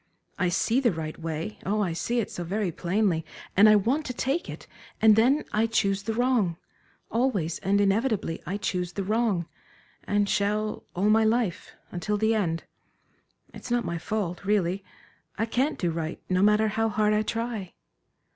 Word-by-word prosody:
I 180 Hz, -1 st, +2 dB
see 225 Hz, +7 st, +2 dB
the 245 Hz, -4 st, +3 dB
right 160 Hz, -2 st, -5 dB
way 165 Hz, +5 st, -4 dB
oh, 210 Hz, +2 st, 0 dB
I 175 Hz, -4 st, -1 dB
see 235 Hz, +8 st, -1 dB
it 220 Hz, -, -2 dB
so 175 Hz, -, -5 dB
very 195 Hz, +2 st, -1 dB
plainly, 175 Hz, -1 st, 0 dB, 0.3 s
and 210 Hz, +3 st, +7 dB
I 215 Hz, -, +7 dB
want 245 Hz, +10 st, +2 dB
to 250 Hz, -, -4 dB
take 275 Hz, +9 st, -1 dB
it; -, -, -8 dB, 0.3 s
and 215 Hz, -1 st, +6 dB
then 255 Hz, +7 st, +3 dB
I 220 Hz, +2 st, +2 dB
choose 200 Hz, -3 st, +1 dB
the 220 Hz, +2 st, -3 dB
wrong 235 Hz, -9 st, +1 dB, 0.5 s
always 215 Hz, -10 st, 0 dB
and 200 Hz, +2 st, +1 dB
inevitably 205 Hz, -3 st, +1 dB
I 195 Hz, -, -3 dB
choose 180 Hz, -3 st, -2 dB
the 200 Hz, -, -2 dB
wrong, 210 Hz, -4 st, +1 dB, 0.6 s
and 205 Hz, 0 st, +1 dB
shall 210 Hz, +2 st, -1 dB
all 200 Hz, +4 st, +2 dB
my 220 Hz, +1 st, +5 dB
life, 220 Hz, -4 st, 0 dB, 0.2 s
until 195 Hz, +4 st, -2 dB
the 220 Hz, +2 st, +2 dB
end. 170 Hz, -7 st, -1 dB, 0.9 s
It's -, -, -9 dB
not 240 Hz, -1 st, +1 dB
my 170 Hz, -1 st, -3 dB
fault, 185 Hz, -2 st, -3 dB
really 195 Hz, -2 st, +1 dB, 0.5 s
I 225 Hz, -, +1 dB
can't 260 Hz, +6 st, 0 dB
do 175 Hz, -2 st, 0 dB
right, 160 Hz, 0 st, -4 dB
no 185 Hz, 0 st, +1 dB
matter 210 Hz, +1 st, +4 dB
how 225 Hz, +2 st, 0 dB
hard 215 Hz, 0 st, +2 dB
I 210 Hz, -, +3 dB
try." 225 Hz, -4 st, -3 dB
210 Hz, 175 wpm, -27 LUFS, 180-225 Hz, 0.9 s, and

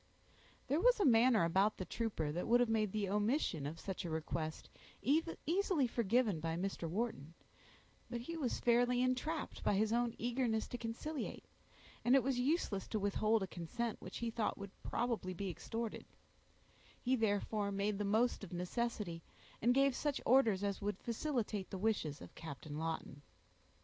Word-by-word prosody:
There 285 Hz, +4 st, +2 dB
was -, -, +5 dB
a 400 Hz, -, +3 dB
manner 230 Hz, -3 st, +6 dB
about 190 Hz, +6 st, +3 dB
the 185 Hz, -, -4 dB
trooper 200 Hz, -11 st, -2 dB
that 175 Hz, +4 st, -3 dB
would 240 Hz, +1 st, +5 dB
have 245 Hz, -2 st, +3 dB
made 215 Hz, -3 st, +1 dB
the 210 Hz, -1 st, -1 dB
omission 205 Hz, -, +1 dB
of 160 Hz, +3 st, -6 dB
such 190 Hz, +1 st, -4 dB
a 175 Hz, -, -4 dB
request 160 Hz, 0 st, -3 dB, 0.4 s
easily 325 Hz, -, +1 dB
forgiven 230 Hz, -4 st, +2 dB
by 165 Hz, +1 st, -2 dB
Mr. 175 Hz, -2 st, -2 dB
Wharton, 170 Hz, -, -3 dB, 0.7 s
but 240 Hz, -1 st, -3 dB
he 335 Hz, +8 st, -5 dB
was 280 Hz, -7 st, -1 dB
fairly 245 Hz, +1 st, +3 dB
entrapped 255 Hz, +5 st, -1 dB
by -, -, +3 dB
his 215 Hz, +2 st, +2 dB
own 240 Hz, -1 st, +1 dB
eagerness 235 Hz, -2 st, 0 dB
to 245 Hz, -, -4 dB
conciliate, 240 Hz, +7 st, -4 dB, 0.6 s
and 245 Hz, +2 st, +5 dB
it 270 Hz, -, +5 dB
was 260 Hz, -1 st, 0 dB
useless 250 Hz, -, 0 dB
to 220 Hz, -, -1 dB
withhold 215 Hz, +2 st, +2 dB
a -, -, -3 dB
consent 215 Hz, +7 st, -4 dB
which -, -, -7 dB
he 235 Hz, -1 st, -2 dB
thought 225 Hz, -1 st, -1 dB
would 200 Hz, -1 st, -7 dB
probably 230 Hz, -6 st, -1 dB
be 195 Hz, +1 st, -3 dB
extorted; 225 Hz, +6 st, -4 dB, 0.9 s
he 255 Hz, +1 st, +2 dB
therefore 210 Hz, -2 st, 0 dB
made 200 Hz, +1 st, -1 dB
the -, -, 0 dB
most 220 Hz, +3 st, +2 dB
of 195 Hz, -, -8 dB
necessity, 180 Hz, -1 st, -2 dB, 0.4 s
and 245 Hz, +3 st, +4 dB
gave 275 Hz, -1 st, +4 dB
such 290 Hz, 0 st, -1 dB
orders 225 Hz, -6 st, +4 dB
as 200 Hz, -1 st, -1 dB
would 205 Hz, -1 st, -1 dB
facilitate 230 Hz, -5 st, -2 dB
the 195 Hz, -, -4 dB
wishes 185 Hz, -8 st, 0 dB
of -, -, -11 dB
Captain 150 Hz, -1 st, -7 dB
Lawton. 160 Hz, -3 st, -4 dB
220 Hz, 170 wpm, -37 LUFS, 190-245 Hz, 0.9 s, manner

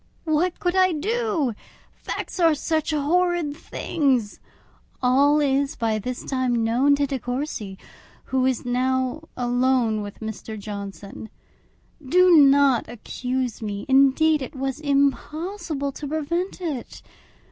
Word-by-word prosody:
What 330 Hz, +3 st, 0 dB
could 355 Hz, 0 st, 0 dB
I 370 Hz, -1 st, +4 dB
do! 385 Hz, -, -1 dB, 0.4 s
Facts -, -, -6 dB
are 330 Hz, -3 st, +4 dB
such 315 Hz, +1 st, -1 dB
horrid 325 Hz, +1 st, +1 dB
things! 265 Hz, -9 st, -1 dB, 0.6 s
All 280 Hz, +4 st, +4 dB
is 280 Hz, +1 st, +1 dB
by 220 Hz, -2 st, 0 dB
this 250 Hz, +4 st, -5 dB
time 255 Hz, -3 st, 0 dB
known 255 Hz, +6 st, +3 dB
to 285 Hz, 0 st, +1 dB
De 270 Hz, -1 st, -3 dB
Courcy, 245 Hz, -6 st, -4 dB, 0.5 s
who 260 Hz, -1 st, 0 dB
is 255 Hz, -2 st, -1 dB
now 260 Hz, +3 st, 0 dB, 0.2 s
alone 245 Hz, -3 st, +1 dB
with 205 Hz, -1 st, -8 dB
Mr. 220 Hz, 0 st, -6 dB
Johnson. 200 Hz, 0 st, -8 dB, 0.7 s
Do 360 Hz, +7 st, +4 dB
not 280 Hz, -5 st, +5 dB
accuse 250 Hz, +1 st, -4 dB
me; 205 Hz, -2 st, -4 dB
indeed, 275 Hz, +3 st, +4 dB
it 260 Hz, -, -7 dB
was 270 Hz, +1 st, -3 dB
impossible 290 Hz, +2 st, -1 dB
to 290 Hz, +2 st, -7 dB
prevent 325 Hz, +6 st, -2 dB
it. 300 Hz, -9 st, -5 dB
275 Hz, 125 wpm, -23 LUFS, 245-310 Hz, 0.7 s, not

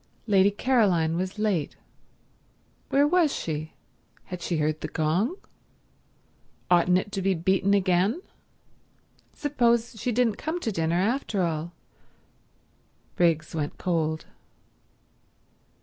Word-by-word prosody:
Lady 200 Hz, -3 st, +4 dB
Caroline 200 Hz, -8 st, +2 dB
was 185 Hz, +3 st, -3 dB
late. 205 Hz, -8 st, -1 dB, 1.1 s
Where 285 Hz, +1 st, +4 dB
was 335 Hz, -2 st, +3 dB
she? 155 Hz, -, -4 dB, 0.5 s
Had 180 Hz, -1 st, -8 dB
she 170 Hz, -1 st, -1 dB
heard 155 Hz, 0 st, -1 dB
the -, -, -3 dB
gong? 175 Hz, -, 0 dB, 1.4 s
Oughtn't 180 Hz, +1 st, +5 dB
it 205 Hz, +2 st, -3 dB
to 195 Hz, -, -3 dB
be 190 Hz, 0 st, +1 dB
beaten 190 Hz, +4 st, +2 dB
again? 190 Hz, -, +2 dB, 1.2 s
Suppose 240 Hz, -5 st, +1 dB
she 250 Hz, -, 0 dB
didn't 230 Hz, -2 st, +1 dB
come 315 Hz, +3 st, -3 dB
to 225 Hz, -, -1 dB
dinner 165 Hz, -2 st, 0 dB
after 210 Hz, -2 st, 0 dB
all... 165 Hz, 0 st, -2 dB, 1.4 s
Briggs 165 Hz, -3 st, +1 dB
went 150 Hz, -2 st, -3 dB
cold. 160 Hz, -3 st, -1 dB
185 Hz, 110 wpm, -26 LUFS, 165-225 Hz, 1.4 s, Oughtn't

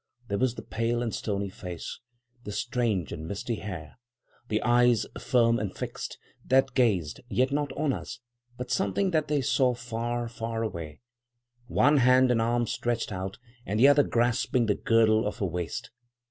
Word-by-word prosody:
There 100 Hz, 0 st, -1 dB
was 130 Hz, -2 st, +1 dB
the -, -, -7 dB
pale 115 Hz, +1 st, -1 dB
and 115 Hz, -, -3 dB
stony 100 Hz, -2 st, -2 dB
face, 90 Hz, -4 st, -7 dB, 0.4 s
the 105 Hz, -, -6 dB
strange 115 Hz, -7 st, -1 dB
and 80 Hz, +1 st, -6 dB
misty 110 Hz, +5 st, -3 dB
hair, 90 Hz, -2 st, -7 dB, 0.5 s
the 110 Hz, -2 st, 0 dB
eyes 120 Hz, -1 st, +4 dB
firm 115 Hz, -2 st, +3 dB
and 100 Hz, -3 st, -4 dB
fixed, -, -, -5 dB, 0.3 s
that 135 Hz, +1 st, +3 dB
gazed, 95 Hz, -, +1 dB
yet 130 Hz, +2 st, +1 dB
not 145 Hz, -1 st, -1 dB
on 145 Hz, -1 st, 0 dB
us, -, -, -6 dB, 0.4 s
but 125 Hz, -, -5 dB
something 195 Hz, 0 st, +1 dB
that 155 Hz, -2 st, +1 dB
they 145 Hz, -1 st, +1 dB
saw 125 Hz, 0 st, +2 dB
far, 120 Hz, 0 st, -3 dB
far 115 Hz, -1 st, -4 dB
away; 85 Hz, -8 st, -6 dB, 0.7 s
one 145 Hz, +4 st, +4 dB
hand 130 Hz, 0 st, +5 dB
and 115 Hz, -2 st, +2 dB
arm 120 Hz, +1 st, +1 dB
stretched 120 Hz, 0 st, -2 dB
out, 95 Hz, +1 st, -4 dB, 0.3 s
and 105 Hz, 0 st, -2 dB
the 130 Hz, -, +8 dB
other 145 Hz, 0 st, +6 dB
grasping 120 Hz, -1 st, +1 dB
the 105 Hz, -, +2 dB
girdle 110 Hz, 0 st, +3 dB
of 105 Hz, -, -4 dB
her 100 Hz, -, -1 dB
waist. 85 Hz, -2 st, -4 dB
115 Hz, 170 wpm, -28 LUFS, 105-125 Hz, 0.7 s, the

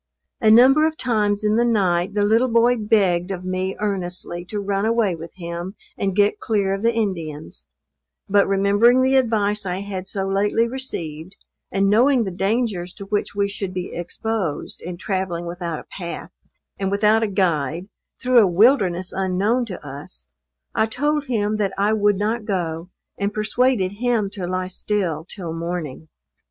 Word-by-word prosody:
A 220 Hz, -4 st, +4 dB
number 265 Hz, +7 st, +7 dB
of 315 Hz, 0 st, -4 dB
times 210 Hz, -4 st, 0 dB
in 210 Hz, +1 st, +2 dB
the 235 Hz, -, +4 dB
night 195 Hz, -4 st, +1 dB
the 205 Hz, -, +2 dB
little 225 Hz, +5 st, +3 dB
boy 235 Hz, +1 st, +4 dB
begged 195 Hz, -5 st, +2 dB
of 185 Hz, -2 st, -5 dB
me 185 Hz, +1 st, -2 dB
earnestly 180 Hz, -4 st, -3 dB
to 210 Hz, +3 st, -4 dB
run 200 Hz, 0 st, -1 dB
away 225 Hz, -3 st, +2 dB
with 165 Hz, 0 st, -9 dB
him 175 Hz, +2 st, -6 dB, 0.2 s
and 195 Hz, -2 st, -2 dB
get 205 Hz, 0 st, +3 dB
clear 200 Hz, -3 st, 0 dB
of 195 Hz, -, -3 dB
the 230 Hz, +1 st, +3 dB
Indians; 155 Hz, -, -4 dB, 0.6 s
but 200 Hz, 0 st, +3 dB
remembering 205 Hz, +6 st, +4 dB
the 265 Hz, +1 st, +3 dB
advice 215 Hz, -5 st, +2 dB
I 185 Hz, 0 st, -3 dB
had 195 Hz, -2 st, -5 dB
so 195 Hz, -1 st, -2 dB
lately 205 Hz, +4 st, +1 dB
received, 185 Hz, -, -5 dB, 0.3 s
and 195 Hz, +1 st, +2 dB
knowing 240 Hz, +5 st, +4 dB
the 190 Hz, -, -4 dB
dangers 195 Hz, -1 st, -1 dB
to 200 Hz, -, -8 dB
which 205 Hz, 0 st, -2 dB
we 200 Hz, 0 st, +1 dB
should 195 Hz, -2 st, -5 dB
be 180 Hz, 0 st, -4 dB
exposed, 180 Hz, -1 st, -3 dB
in 175 Hz, 0 st, -6 dB
travelling 185 Hz, -3 st, -3 dB
without 170 Hz, -2 st, -4 dB
a -, -, -9 dB
path 170 Hz, -3 st, -6 dB, 0.5 s
and 195 Hz, -1 st, 0 dB
without 210 Hz, +2 st, +3 dB
a 225 Hz, -, +1 dB
guide, 170 Hz, -3 st, 0 dB, 0.3 s
through 255 Hz, -1 st, +4 dB
a 210 Hz, -, +5 dB
wilderness 185 Hz, -2 st, +3 dB
unknown 195 Hz, +6 st, +1 dB
to 180 Hz, -7 st, -8 dB
us, 135 Hz, -, -9 dB, 0.5 s
I 220 Hz, -, +2 dB
told 295 Hz, +5 st, 0 dB
him 215 Hz, -3 st, 0 dB
that 195 Hz, -2 st, -1 dB
I 205 Hz, +2 st, +2 dB
would 205 Hz, -2 st, +2 dB
not 215 Hz, +2 st, -1 dB
go, 170 Hz, -4 st, -2 dB, 0.3 s
and 200 Hz, +1 st, 0 dB
persuaded 215 Hz, -1 st, +1 dB
him 230 Hz, -5 st, +1 dB
to 190 Hz, -4 st, -5 dB
lie 185 Hz, 0 st, -2 dB
still 180 Hz, -5 st, -2 dB
till 175 Hz, -5 st, -5 dB
morning. 165 Hz, -3 st, -5 dB
200 Hz, 170 wpm, -22 LUFS, 180-220 Hz, 0.6 s, number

